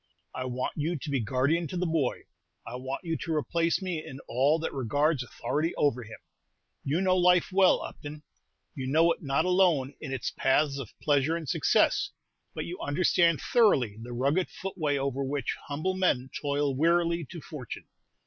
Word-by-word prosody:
I 130 - -4
want 125 0 -3
you 160 +3 -1
to 150 - -7
be 135 - +1
guardian 135 +8 +1
to 180 - -5
the 180 - 0
boy. 160 -6 0 0.4
I 115 - -7
want 130 +2 -5
you 165 -2 -2
to 165 - -2
replace 165 +4 0
me 175 -4 -3
in 135 - -9
all 140 +6 +3
that 165 - -4
regards 145 +3 +1
authority 145 +7 -2
over 140 -4 +1
him. 115 -1 -10 0.7
You 150 +6 0
know 185 -1 +3
life 180 0 +4
well, 190 0 +4
Upton. 150 +1 -8 0.5
You 130 -3 -5
know 165 +5 +4
it - - -3
not 140 +2 0
alone 175 -7 +3
in 145 - -6
its 130 -3 -2
paths 140 +1 +1
of 125 -6 -6
pleasure 145 +2 +2
and 165 -3 -5
success, - - +2 0.5
but - - -3
you 175 +2 -6
understand 170 +1 +2
thoroughly 140 - +3
the 120 +2 -8
rugged 140 +9 0
footway 155 -7 -2
over 140 0 -1
which 135 -2 -2
humble 155 +6 -1
men 140 -9 0
toil 145 -1 -1
wearily 170 +3 +2
to 170 - -7
fortune. 145 -6 -8
150 Hz, 175 wpm, -28 LUFS, 135-170 Hz, 0.7 s, life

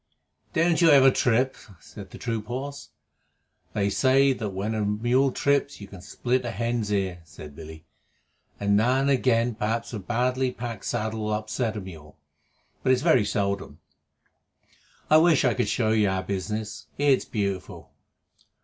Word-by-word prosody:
"Don't 170 0 +2
you 165 - +6
ever 135 -2 +7
trip?" 130 +1 +1 0.2
said 100 0 -12
the - - -11
troop 115 -3 -4
horse. 140 +4 -6 0.8
"They 100 -1 0
say 135 +4 +3
that 110 -5 -4
when 100 +3 -3
a 110 -1 -1
mule 120 +6 +1
trips 140 +1 0
you 100 - -9
can 95 -2 -12
split 125 +6 -1
a 120 - -3
hen's 115 -2 -2
ear," 95 -3 -1
said 75 -1 -12
Billy. 80 0 -11 0.7
"Now 105 +6 +2
and 140 +1 +2
again 120 -2 +2
perhaps 115 +2 -3
a 110 - -3
badly 125 +5 0
packed 115 -3 -6
saddle 110 0 -2
will 105 - -1
upset 110 +1 -2
a - - -4
mule, 80 -6 -12 0.6
but 130 - +2
it's 130 +1 +2
very 160 -9 +4
seldom. 100 -2 -2 1.3
I 155 - +6
wish 160 -3 +4
I 125 - +3
could 105 - -1
show 110 -1 +1
you 105 -2 +3
our 95 -1 -1
business. 105 +2 -4
It's 145 -2 +2
beautiful. 100 -4 -4
110 Hz, 160 wpm, -25 LUFS, 100-130 Hz, 1.3 s, ever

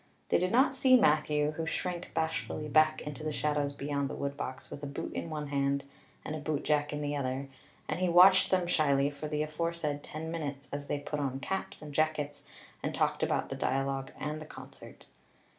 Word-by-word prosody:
They - - +4
did 180 +1 0
not 265 +4 +5
see 260 -1 +6
Matthew, 150 -3 +3
who 160 +1 -4
shrank 175 +1 -3
bashfully 160 -1 -1
back 155 +1 +4
into 150 0 -6
the 155 - -1
shadows 150 -1 0
beyond 140 0 -2
the - - -5
woodbox 140 -2 -4
with 145 - -7
a 145 - -4
boot 140 - -5
in - - -4
one 150 -2 -4
hand 140 0 +1 0.4
and - - -3
a - - -4
bootjack 150 0 0
in 150 0 -3
the 145 0 -1
other, 135 0 -2 0.4
and - - -2
he 185 -1 +2
watched 180 +2 +7
them 185 -2 +2
shyly 145 -4 +3
for 145 +1 -6
the 150 0 0
aforesaid 155 -1 -2
ten 160 +2 -6
minutes 145 -4 -4
as 145 0 -4
they - - 0
put 145 +1 -4
on 135 -2 -1
caps 190 +1 -4
and 150 -1 -8
jackets 150 -1 0 0.4
and - - -2
talked - - +1
about - - 0
the - - -3
dialogue 135 0 -1
and 150 +1 -3
the 155 - -8
concert. - - -12
150 Hz, 200 wpm, -31 LUFS, 140-155 Hz, 0.4 s, watched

